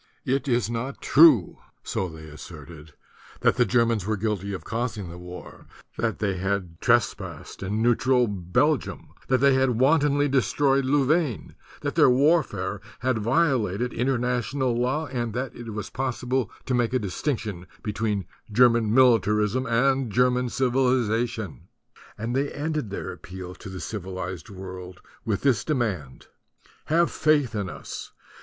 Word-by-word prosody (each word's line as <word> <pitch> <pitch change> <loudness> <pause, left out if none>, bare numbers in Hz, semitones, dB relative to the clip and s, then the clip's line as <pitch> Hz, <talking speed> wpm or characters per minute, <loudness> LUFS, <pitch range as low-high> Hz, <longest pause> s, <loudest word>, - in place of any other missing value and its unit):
"It 135 +2 0
is 120 -3 +1
not 120 +4 -4
true," 145 - +5 0.2
so 95 - -2
they 80 -1 -11
asserted, 75 0 -11 0.5
that - - +3
the 125 - +4
Germans 115 -2 +2
were 110 +2 -1
guilty 100 -1 -2
of 95 - -5
causing 115 -6 -3
the 85 - -9
war, 90 0 -11 0.3
that 115 -2 -1
they 100 -3 -1
had 95 -3 -3
trespassed - - 0
in 105 +4 -1
neutral 125 +1 +3
Belgium, 105 - -1 0.2
that 130 - +3
they 140 -1 +5
had 130 -3 +2
wantonly 145 +1 +3
destroyed 135 +1 +2
Louvain, 140 - +1 0.3
that - - -2
their - - +5
warfare 125 - +2 0.2
had 130 -2 +1
violated 120 - +1
international 125 +1 0
law, 130 +6 0
and 120 -5 -3
that 130 0 -3
it 120 -1 -8
was 110 -1 -6
possible 130 -3 -1 0.2
to 130 - -1
make 120 0 +1
a - - +5
distinction 105 - -3 0.2
be 105 - -3
tween 105 -3 -1 0.3
German 115 -1 +4
militarism 115 -1 +3
and 130 +1 +2
German 125 +3 +2
civiliza 125 -2 +1
tion. 100 - -8 0.5
And 115 +3 -3
they 140 +1 0
ended 150 -5 -3
their 100 - -5
appeal 90 0 -9
to 95 - -10
the 95 - -7
civi 95 -1 -5
lized 95 0 -5
world 95 -2 -9 0.3
with 105 -4 -1
this 125 -8 +3
demand: 100 - -2 0.6
"Have 170 +2 +3
faith 150 -6 +2
in 100 -4 -2
us - - -8
120 Hz, 150 wpm, -25 LUFS, 100-130 Hz, 0.6 s, true